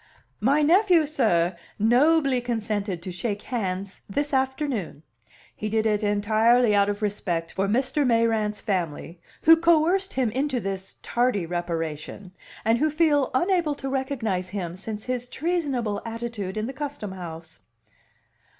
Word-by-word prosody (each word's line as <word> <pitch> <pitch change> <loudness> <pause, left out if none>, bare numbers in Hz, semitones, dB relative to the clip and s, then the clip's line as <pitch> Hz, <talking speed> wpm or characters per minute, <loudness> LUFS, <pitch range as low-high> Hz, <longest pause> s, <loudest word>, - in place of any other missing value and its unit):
"My 280 +7 +3
nephew, 350 0 +5
sir, 190 - +1 0.2
nobly 260 +4 +3
consented 210 -6 -2
to 185 - -5
shake 205 +3 -3
hands 195 -5 -3
this 285 +8 -2
afternoon. 265 - -1 0.5
He 215 - -4
did 220 +1 +1
it 210 -1 +2
entirely 215 +3 +3
out 200 0 +4
of 205 +1 -3
respect 175 -5 -2
for 195 +1 -1
Mr. 260 +7 +1
Mayrant's 225 -4 +1
family, 170 -3 -3 0.2
who 325 +2 +9
coerced 340 +4 +3
him 255 -4 0
into 265 +1 -1
this 195 -2 -5
tardy 240 -7 +1
reparation, 165 +1 -4 0.3
and 225 +1 +3
who 310 +2 +2
feel 300 -3 +2
unable 345 0 +2
to 270 -1 -5
recognize 240 -9 -2
him 180 -4 -4
since 210 +2 -6
his 250 -1 -2
treasonable 275 - -1
attitude 230 -4 -5
in 215 - -1
the 265 - -5
Custom 285 -7 -5
House." 165 -3 -9
225 Hz, 140 wpm, -25 LUFS, 195-275 Hz, 0.5 s, who